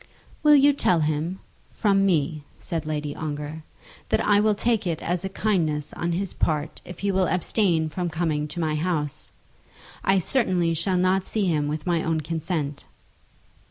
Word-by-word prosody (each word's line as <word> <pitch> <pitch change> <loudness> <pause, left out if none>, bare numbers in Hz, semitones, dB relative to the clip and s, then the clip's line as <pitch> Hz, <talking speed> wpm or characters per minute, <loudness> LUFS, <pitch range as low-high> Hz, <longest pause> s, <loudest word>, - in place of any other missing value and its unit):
"Will 300 -1 +7
you 285 0 +6
tell 180 - +3
him, 155 +5 -1 0.3
from 195 -2 +2
me," 155 -4 0
said 165 -4 -4
Lady 150 -1 -3
Ongar, 150 0 -5 0.5
"that - - +2
I 205 -1 +4
will 210 0 +3
take 220 -1 0
it 165 -2 -1
as 175 +1 -1
a 190 - -2
kindness 165 -8 -1
on 170 0 -2
his 185 +2 -2
part 155 -1 -1
if 180 - -10
he 200 0 +1
will 190 -1 +2
abstain 175 -1 +1
from 175 +3 -3
coming 160 -2 -1
to 170 +4 -6
my 160 -2 0
house. 155 -2 -2 0.7
I 195 0 +3
certainly 185 -5 +1
shall 180 +3 0
not 185 +1 +2
see 210 0 -1
him 150 -5 +1
with 150 +1 -3
my 170 -2 +1
own 160 -1 0
consent." 155 -2 -3
170 Hz, 170 wpm, -25 LUFS, 155-190 Hz, 0.7 s, Will